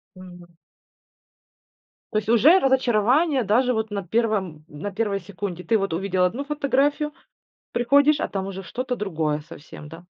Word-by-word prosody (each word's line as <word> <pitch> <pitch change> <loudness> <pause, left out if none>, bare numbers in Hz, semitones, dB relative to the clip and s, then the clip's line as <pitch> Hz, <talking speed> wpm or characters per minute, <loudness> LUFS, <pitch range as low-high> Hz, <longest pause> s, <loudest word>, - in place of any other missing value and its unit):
Мгм. 175 -2 -14 1.6
То - - 0
есть 215 0 -2
уже 260 - +6
разочарование 265 - +2
даже 245 +5 +2
вот 220 -1 -2
на 200 -2 -4
первом 190 -7 -1
на 155 +7 -7
первой 200 -1 -1
секунде. 185 -2 -6
Ты 225 - +2
вот 195 -4 -2
увидел 185 +1 0
1 235 +10 -2
фотографию, 290 +1 0 0.6
приходишь, 285 +5 +3
а - - -2
там 195 -1 -4
уже 195 0 -7
что-то 250 +7 -4
другое 160 -8 -2
совсем, 150 0 -12
да? 165 +3 -12
210 Hz, 145 wpm, -23 LUFS, 180-255 Hz, 1.6 s, уже